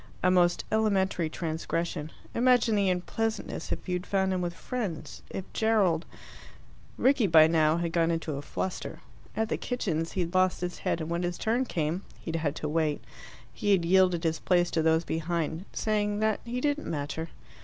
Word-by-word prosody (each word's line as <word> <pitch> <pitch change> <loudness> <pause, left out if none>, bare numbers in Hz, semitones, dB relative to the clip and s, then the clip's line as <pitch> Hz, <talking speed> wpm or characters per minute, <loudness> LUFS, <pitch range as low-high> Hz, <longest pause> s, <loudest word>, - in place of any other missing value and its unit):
A 185 - +5
most 175 -1 +3
elementary 195 -6 +1
transgression. 160 -1 -3 0.2
Imagine 245 -2 +4
the 200 -2 +2
unpleasantness 220 +5 -2
if - - -3
you 180 - -1
had 180 +1 -3
found 190 -1 +1
him 185 - -1
with 175 -1 -3
friends. 190 - -5
If 190 - -5
Gerald 200 -7 +2 0.5
" - - -25
Rickie 265 -6 +4
by 160 -2 +8
now 160 0 +3
had 170 -1 -1
got 165 -1 +2
into 165 -2 -1
a 140 - -4
fluster. 185 +5 -4 0.4
At 220 0 0
the - - 0
kitchens 170 -10 -2
he 185 - 0
had 170 0 -3
lost 185 -1 +2
his 180 0 -4
head, 165 - -1
and 160 - -4
when 170 +1 0
his 175 -1 -2
turn 235 +4 +1
came 165 -3 -1 0.2
he - - -8
had 165 - -1
had 155 -2 -1
to 150 - -3
wait 155 -1 0 0.5
he 205 -1 +1
had 175 -3 +2
yielded 180 -1 +4
his 160 -1 0
place 175 -1 +2
to 160 - +1
those 160 +1 +3
behind, 165 +1 -2
saying 210 -1 0
that 215 0 +1
he 240 +1 -3
didn't 290 +2 -1
matter. 160 +2 -3
175 Hz, 190 wpm, -28 LUFS, 165-205 Hz, 0.5 s, by